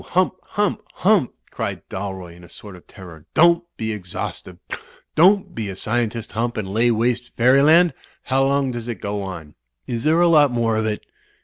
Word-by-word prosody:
Hump! 185 +1 +1
Hump! 205 0 -1
Hump!'' 190 - +2 0.2
cried - - -5
Dalroy 95 -3 -6
in 90 - -16
a 85 - -14
sort 100 +3 -11
of 90 - -17
terror. 85 -5 -13
"Don't 170 +1 +5
be 110 0 -2
exhaustive! 90 -4 -6 0.6
Don't 190 +5 +4
be 110 -3 -4
a 95 - -6
scientist. 115 +2 -2
Hump, 120 +2 -2
and 95 -2 -4
lay 115 +3 +3
waste 120 +2 0
fairyland! 145 +8 +5 0.3
How 135 +1 +1
long 140 -1 +1
does 120 -1 -6
it 120 - -3
go 100 0 -3
on? 85 -6 -7 0.3
Is 115 -1 -4
there 160 +2 +3
a 175 - +5
lot 150 -4 +5
more 115 -2 0
of 110 0 0
it?" 105 -1 -3
115 Hz, 185 wpm, -21 LUFS, 100-145 Hz, 0.6 s, Don't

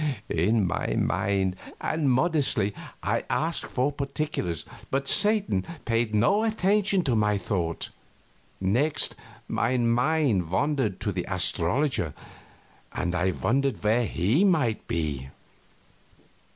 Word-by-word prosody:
In 100 +6 +2
my - - -1
mind 95 -2 0 0.2
and 155 -3 0
modestly 130 - +2 0.3
I - - 0
asked 165 +1 -1
for 130 +3 0
particulars, 140 - -3 0.2
but 135 +1 -1
Satan 205 - +3 0.2
paid 115 -2 0
no 200 - +3
attention 205 -3 +2
to 130 -6 +1
my 105 -1 +2
thought. 90 -3 -3 0.7
Next, 125 +11 +2 0.3
my 130 - 0
mind 120 - +1
wandered 120 - 0
to 105 - -1
the 90 -2 -3
astrologer, 95 - +1 0.8
and 90 -1 -2
I 90 +2 +1
wondered 135 +7 0
where 110 +2 +2
he 105 - +1
might 150 - +1
be. 75 -5 -2
115 Hz, 110 wpm, -26 LUFS, 95-150 Hz, 0.8 s, Satan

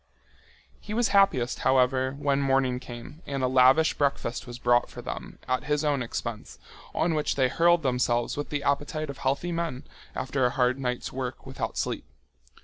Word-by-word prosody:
He 210 - -6
was 240 0 +2
happiest, 195 -12 +3
however, 130 0 +2
when 140 -1 +1
morning 135 -2 +2
came 125 +6 -10
and 135 -2 -2
a - - +3
lavish 130 +5 +5
breakfast 135 -4 -1
was 120 0 -7
brought 120 0 +2
for - - -10
them - - -6
at 130 +3 0
his 150 0 0
own 145 -3 +1
expense, 115 -2 -5 0.4
on 165 0 +1
which 150 -1 0
they 130 -2 +3
hurled 170 +3 +3
themselves 125 -2 +1
with 145 - -4
the 145 -1 -2
appetite 145 +1 -1
of 140 - -12
healthy 140 +6 -1
men 165 -6 -3 0.3
after 130 +1 -1
a 125 - +4
hard 125 +1 +1
night's 125 -2 -3
work 130 -2 -5
without - - -4
sleep. - - -2
135 Hz, 175 wpm, -27 LUFS, 125-150 Hz, 0.4 s, lavish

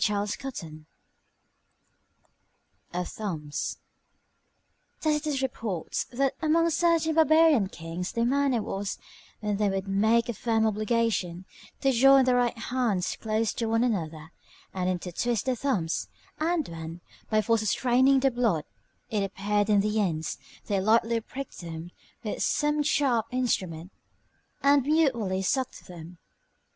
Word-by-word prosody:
CHAPTER 210 +5 -1
XXVI 155 -10 -9 2.1
OF 180 0 -3
THUMBS 160 -9 -4 1.2
Tacitus 300 -3 0
reports, 220 -9 -3
that 270 +2 0
amongst 330 +1 +2
certain 335 -2 +3
barbarian 315 -8 +5
kings 170 +2 -5
their 230 0 0
manner 265 -3 +2
was, 195 0 -3 0.4
when 210 -1 -1
they 210 -1 +2
would 195 0 -2
make 220 +4 +2
a 240 - -2
firm 225 +1 +1
obligation, 215 -5 0 0.4
to 270 - +3
join 270 +2 +6
their 250 -1 +3
right 245 -1 +1
hands 230 -6 -1
close 220 0 0
to 230 - -2
one 225 +1 +2
another, 165 -8 -2 0.4
and 185 -1 -1
intertwist 185 +5 -1
their 260 - +1
thumbs; 210 -11 -1 0.3
and 325 -1 0
when, 165 +1 -7 0.3
by 215 - +3
force 225 +1 +2
of 215 - -2
straining 260 +4 +3
the 270 0 +3
blood, 230 -11 +1 0.5
it 210 -2 +1
appeared 205 +1 0
in 205 -1 +5
the 210 +1 +1
ends, 160 -5 -2 0.3
they 200 -2 0
lightly 225 +2 +2
pricked 270 +4 -8
them 165 0 -7 0.3
with 215 - -4
some 295 0 +1
sharp 265 -6 +1
instrument, 185 -9 -1 0.7
and 280 0 +5
mutually 245 -10 +1
sucked 260 +6 -1
them. 175 0 -11
225 Hz, 130 wpm, -27 LUFS, 190-265 Hz, 2.1 s, join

